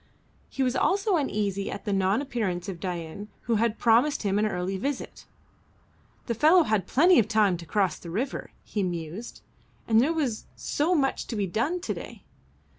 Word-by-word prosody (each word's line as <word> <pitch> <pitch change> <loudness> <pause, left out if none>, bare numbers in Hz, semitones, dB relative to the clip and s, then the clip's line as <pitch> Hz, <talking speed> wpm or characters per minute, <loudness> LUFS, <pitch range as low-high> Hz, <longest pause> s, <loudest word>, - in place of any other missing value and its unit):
He 270 - -1
was 255 0 0
also 390 +7 +2
uneasy 205 - -1
at 200 - -6
the 205 - 0
non 195 +6 +2
appearance 210 -9 -2
of 185 -3 -5
Dain 180 +2 -5
who 230 -1 0
had 225 0 +1
promised 240 +6 +3
him 200 0 +1
an 215 - +2
early 185 -1 -2
visit. 270 +7 -4 1.0
"The 235 - -1
fellow 315 - +5
had 215 - 0
plenty 345 +5 +5
of 215 - +2
time 215 -4 +3
to 170 -1 -11
cross 190 -1 0
the 170 - -9
river," 240 +10 -3
he 210 - -3
mused, 175 +4 -5 0.5
"and 225 0 +5
there 285 +6 +2
was 280 -9 -2
so 325 +5 0
much 270 -4 0
to 235 - -4
be 205 -2 0
done 250 - -1
to - - -2
day. - - -9
215 Hz, 185 wpm, -27 LUFS, 195-270 Hz, 1.0 s, fellow